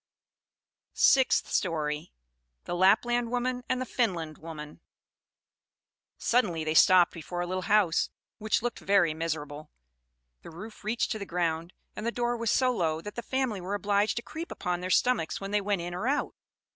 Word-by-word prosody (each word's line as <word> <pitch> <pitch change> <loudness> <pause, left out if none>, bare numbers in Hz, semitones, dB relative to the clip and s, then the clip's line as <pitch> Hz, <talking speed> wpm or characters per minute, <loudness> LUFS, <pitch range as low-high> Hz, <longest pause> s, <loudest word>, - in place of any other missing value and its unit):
SIXTH 265 -2 +4
STORY. 155 -4 -1 0.5
The - - -5
Lapland 230 +6 +3
Woman 250 +1 -1
and 255 - +1
the 255 - -2
Finland 175 - -1
Woman 150 -2 -9 1.4
Suddenly 185 -10 +1
they 155 0 -1
stopped 180 +2 +6
before 175 +2 -5
a - - -1
little 185 +1 -4
house, 200 -6 +3 0.3
which 215 +1 0
looked 240 - -2
very 195 -5 +3
miserable. 155 -2 -4 0.7
The - - -11
roof 210 +8 -10
reached 220 +3 -1
to 220 - -2
the 200 - -5
ground; 170 0 -1 0.2
and - - -6
the 235 - 0
door 240 0 -1
was 230 -1 -2
so 255 +3 +3
low, 160 -5 0
that 210 +4 -7
the 235 - -5
family 255 -6 -2
were 190 +3 -3
obliged 205 +1 +1
to 235 - -3
creep 325 +2 -7
upon 180 0 -3
their 185 - -4
stomachs 215 -4 +2
when 195 0 -6
they 210 0 +2
went 200 -3 -1
in 175 0 -5
or 185 +7 -3
out. 280 - 0
195 Hz, 170 wpm, -28 LUFS, 165-235 Hz, 1.4 s, stopped